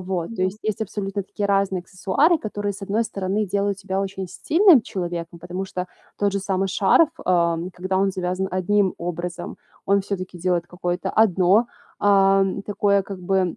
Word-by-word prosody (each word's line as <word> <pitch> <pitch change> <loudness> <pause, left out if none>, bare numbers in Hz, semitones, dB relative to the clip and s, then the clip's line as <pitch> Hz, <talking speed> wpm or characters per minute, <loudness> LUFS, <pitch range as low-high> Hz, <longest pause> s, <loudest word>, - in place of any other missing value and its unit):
вот, 185 +3 -4
то 185 - -1
есть, 185 +3 -1
есть 215 0 -2
абсолютно 200 -2 -3
такие 205 +1 -3
разные 195 -2 +1
аксессуары, 195 - +1
которые, 205 -4 -3
с 195 - -11
одной 205 +3 0
стороны, 200 -1 -2
делают 200 0 -1
тебя 195 0 -2
очень 195 -1 -4
стильным 320 - +4
человеком. 175 -3 -5
Потому 180 +2 -4
что, 185 -1 -4 0.3
тот 200 -1 +1
же 200 - 0
самый 195 0 -1
шарф, 195 - +4
э, 170 -2 +2 0.2
когда 185 +1 -1
он 195 0 +2
завязан 185 +1 -2
одним 190 +1 +1
образом, 175 0 -5 0.3
он 200 0 +3
всё-таки 185 -2 -5
делает 175 0 0
какое-то 180 0 -3
одно, 200 +1 +4 0.3
ам, 195 -1 +3
такое, 200 -1 +1
как 195 0 -8
бы, 185 -1 0
195 Hz, 170 wpm, -23 LUFS, 180-200 Hz, 0.3 s, стильным